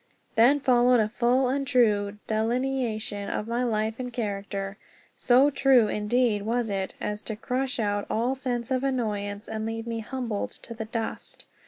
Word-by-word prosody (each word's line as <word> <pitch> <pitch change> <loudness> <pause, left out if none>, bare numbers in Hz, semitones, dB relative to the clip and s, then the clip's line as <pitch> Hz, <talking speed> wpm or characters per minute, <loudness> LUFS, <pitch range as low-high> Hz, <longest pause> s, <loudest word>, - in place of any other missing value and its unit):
_" - - -39 0.3
Then 250 +6 +5
followed 250 -2 +4
a 215 -1 +2
full 245 +3 +2
and 275 +2 -1
true 210 -6 +2
delineation 225 -2 -1
of 210 - -3
my 235 +2 0
life 220 -1 -1
and 250 -1 -4
character. 200 -3 -4 0.4
So 265 +3 +4
true, 265 -5 +4
indeed, 210 0 +1
was 230 +1 -1
it, 195 -1 -3
as 210 0 -3
to 220 - -4
crush 255 +4 -2
out 205 -2 -1
all 240 +4 +1
sense 250 -2 -3
of 260 0 +1
annoyance 210 -5 -2
and 220 0 -4
leave 225 +1 -4
me 230 -1 -3
humbled 230 -2 -3
to 235 - -7
the 225 -1 -5
dust. 225 0 -5
230 Hz, 170 wpm, -27 LUFS, 210-250 Hz, 0.4 s, Then